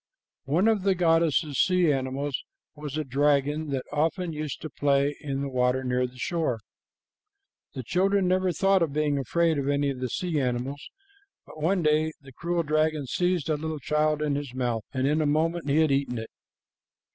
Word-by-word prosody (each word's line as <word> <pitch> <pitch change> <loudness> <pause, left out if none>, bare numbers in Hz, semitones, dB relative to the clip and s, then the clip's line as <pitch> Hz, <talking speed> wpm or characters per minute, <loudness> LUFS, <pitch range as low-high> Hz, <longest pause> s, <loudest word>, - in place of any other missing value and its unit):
One 165 +10 +2
of 220 -3 +3
the 195 0 +2
goddess's 165 -4 +2
sea 180 -4 +4
animals 135 +1 -2 0.3
was 150 -1 -6
a 155 - 0
dragon, 145 +2 +1
that 135 -2 -2
often 165 +3 0
used 150 -2 -4
to 155 - -4
play 140 0 +1
in 140 -3 -3
the 140 - -2
water 130 0 +1
near 125 0 0
the 125 +1 -16
shore. 160 -3 -1 1.2
The 130 - -4
children 190 - +2
never 185 0 +2
thought 195 +3 +2
of 160 -4 0
being 150 -1 +1
afraid 160 +4 +1
of 140 0 -1
any 140 0 +1
of 130 - -7
the 125 -1 -2
sea 170 +3 -1
animals, 130 +3 -3 0.6
but 155 - -12
one 180 +3 +1
day 155 +1 +2
the 140 -1 -14
cruel 170 +4 -1
dragon 155 -1 +1
seized 175 +3 0
a 155 -2 +1
little 160 +1 -4
child 150 +1 0
in 150 -1 0
his 140 -3 -4
mouth, 120 -4 -1
and 130 -1 -1
in 150 +3 +2
a 150 - +1
moment 160 +2 0
he 150 +3 +4
had 155 -2 +3
eaten 135 -3 0
it. 110 0 -6
150 Hz, 190 wpm, -26 LUFS, 135-165 Hz, 1.2 s, sea